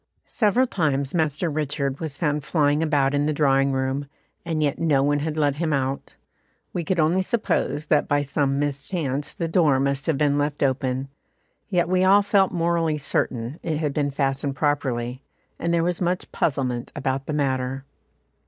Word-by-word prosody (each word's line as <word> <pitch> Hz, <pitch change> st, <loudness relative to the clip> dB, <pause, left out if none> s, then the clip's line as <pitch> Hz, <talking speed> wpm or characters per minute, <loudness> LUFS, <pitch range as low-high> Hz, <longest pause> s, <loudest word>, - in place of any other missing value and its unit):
Several 230 Hz, +3 st, +2 dB
times 140 Hz, -, -1 dB
Master 160 Hz, 0 st, 0 dB
Richard 145 Hz, -3 st, -2 dB
was 155 Hz, -4 st, -5 dB
found 150 Hz, -2 st, 0 dB
flying 150 Hz, -1 st, +2 dB
about 145 Hz, -4 st, +2 dB
in 145 Hz, +1 st, +1 dB
the 155 Hz, -, +1 dB
drawing 135 Hz, -2 st, +3 dB
room, 135 Hz, +1 st, -1 dB, 0.4 s
and 160 Hz, -3 st, -1 dB
yet 145 Hz, -2 st, 0 dB
no 150 Hz, -5 st, +2 dB
one 145 Hz, +1 st, +2 dB
had 155 Hz, +1 st, -3 dB
let 145 Hz, -2 st, +1 dB
him 165 Hz, 0 st, -1 dB
out; 135 Hz, 0 st, -2 dB, 0.6 s
we 175 Hz, -, -2 dB
could 180 Hz, +2 st, -1 dB
only 165 Hz, +4 st, +3 dB
suppose 185 Hz, -8 st, -1 dB
that 150 Hz, -1 st, +2 dB
by 145 Hz, 0 st, +2 dB
some 140 Hz, -1 st, 0 dB
mischance 145 Hz, 0 st, -2 dB
the 165 Hz, -, -2 dB
door 160 Hz, -5 st, +3 dB
must 140 Hz, 0 st, -1 dB
have 160 Hz, -4 st, +1 dB
been 145 Hz, 0 st, +2 dB
left 145 Hz, 0 st, -1 dB
open; 130 Hz, 0 st, 0 dB, 0.6 s
yet 175 Hz, -4 st, +1 dB
we 185 Hz, +1 st, +2 dB
all 200 Hz, +2 st, +6 dB
felt 200 Hz, -2 st, +3 dB
morally 165 Hz, -3 st, +1 dB
certain 130 Hz, -1 st, -2 dB
it 160 Hz, -3 st, -2 dB
had 150 Hz, -2 st, -1 dB
been 145 Hz, -1 st, 0 dB
fastened 135 Hz, 0 st, -1 dB
properly, 130 Hz, -4 st, -1 dB, 0.4 s
and 170 Hz, -, -1 dB
there 170 Hz, -1 st, +2 dB
was 175 Hz, +1 st, -1 dB
much 180 Hz, +1 st, -1 dB
puzzlement 125 Hz, -5 st, -1 dB
about 135 Hz, +1 st, -2 dB
the 155 Hz, -, -2 dB
matter. 135 Hz, -2 st, -1 dB
145 Hz, 175 wpm, -24 LUFS, 135-165 Hz, 0.6 s, all